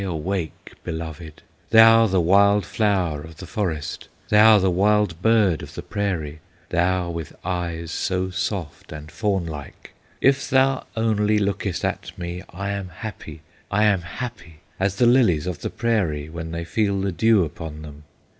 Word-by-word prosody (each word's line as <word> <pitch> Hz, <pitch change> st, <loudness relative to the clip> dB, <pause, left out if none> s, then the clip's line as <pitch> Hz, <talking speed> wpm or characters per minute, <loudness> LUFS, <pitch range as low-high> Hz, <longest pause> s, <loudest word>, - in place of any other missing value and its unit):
Awake, 90 Hz, -1 st, -4 dB
beloved! 80 Hz, -1 st, -7 dB, 0.3 s
Thou 115 Hz, 0 st, +7 dB
the 95 Hz, -2 st, +1 dB
wild 100 Hz, +3 st, +4 dB
flower 95 Hz, -8 st, 0 dB
of 80 Hz, +1 st, -12 dB
the -, -, -8 dB
forest! 85 Hz, -10 st, -4 dB, 0.2 s
Thou 105 Hz, +1 st, +7 dB
the 95 Hz, -2 st, +2 dB
wild 100 Hz, -2 st, +2 dB
bird 105 Hz, -7 st, +3 dB
of -, -, -10 dB
the -, -, -6 dB
prairie! 85 Hz, -8 st, -3 dB, 0.3 s
Thou 90 Hz, 0 st, +1 dB
with 85 Hz, -3 st, -6 dB
eyes 85 Hz, -2 st, -3 dB
so 95 Hz, +2 st, -1 dB
soft 90 Hz, -3 st, -4 dB
and 75 Hz, 0 st, -9 dB
fawn 100 Hz, -2 st, -1 dB
like! 75 Hz, -3 st, -9 dB, 0.3 s
"If 135 Hz, +1 st, +2 dB
thou 135 Hz, 0 st, +2 dB
only 110 Hz, -1 st, +2 dB
lookest 100 Hz, -2 st, -1 dB
at -, -, -4 dB
me, 85 Hz, 0 st, -5 dB
I 100 Hz, +3 st, -4 dB
am 100 Hz, -2 st, -4 dB
happy, 90 Hz, -7 st, -8 dB, 0.3 s
I 105 Hz, +1 st, +2 dB
am 100 Hz, -4 st, +3 dB
happy, 85 Hz, -4 st, -8 dB, 0.2 s
As 95 Hz, 0 st, 0 dB
the 120 Hz, -, +3 dB
lilies 115 Hz, -, +4 dB
of 90 Hz, -3 st, -4 dB
the -, -, -3 dB
prairie, 90 Hz, -11 st, -1 dB
When 80 Hz, 0 st, -6 dB
they 85 Hz, +1 st, -4 dB
feel 100 Hz, +2 st, 0 dB
the 95 Hz, 0 st, -1 dB
dew 105 Hz, +2 st, +3 dB
upon 75 Hz, 0 st, -8 dB
them! 75 Hz, -1 st, -11 dB
95 Hz, 160 wpm, -23 LUFS, 80-105 Hz, 0.3 s, Thou